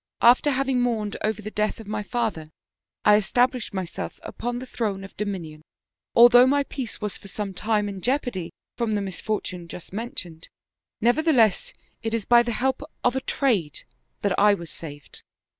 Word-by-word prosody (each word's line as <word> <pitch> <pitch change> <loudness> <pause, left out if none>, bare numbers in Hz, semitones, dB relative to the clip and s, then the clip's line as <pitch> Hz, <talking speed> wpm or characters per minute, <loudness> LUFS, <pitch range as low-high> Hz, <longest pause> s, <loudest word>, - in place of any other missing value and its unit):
After 245 +5 +6
having 265 -2 +1
mourned 220 -4 -1
over 215 0 -1
the 215 - -6
death 215 +1 -1
of 225 - -9
my 210 +1 -3
father 215 -9 -2 0.6
I 210 0 +7
established 245 +4 +1
myself 190 -4 -5
upon 240 +1 -4
the 255 - -6
throne 205 -6 -3
of 195 - -11
dominion. 180 -7 -5 0.5
Although 245 +1 +8
my 285 +1 +3
peace 265 -4 -5
was 210 -2 -3
for - - -12
some 200 0 -4
time 210 +1 0
in 195 -2 -6
jeopardy 245 - -1 0.3
from 235 -3 -1
the 205 - 0
misfortune 190 -2 -3
just 175 +1 -10
men 230 +4 -3
tioned, 165 - -5 0.5
nevertheless 240 - +3 0.3
it 225 0 -1
is 220 -3 -3
by 240 -1 +6
the 240 0 -2
help 260 +4 0 0.2
of 245 +1 +2
a 265 - 0
trade 215 - 0 0.4
that 200 -2 +1
I 205 0 +6
was 170 -4 -9
saved. 145 -3 -9
215 Hz, 175 wpm, -25 LUFS, 195-245 Hz, 0.6 s, Although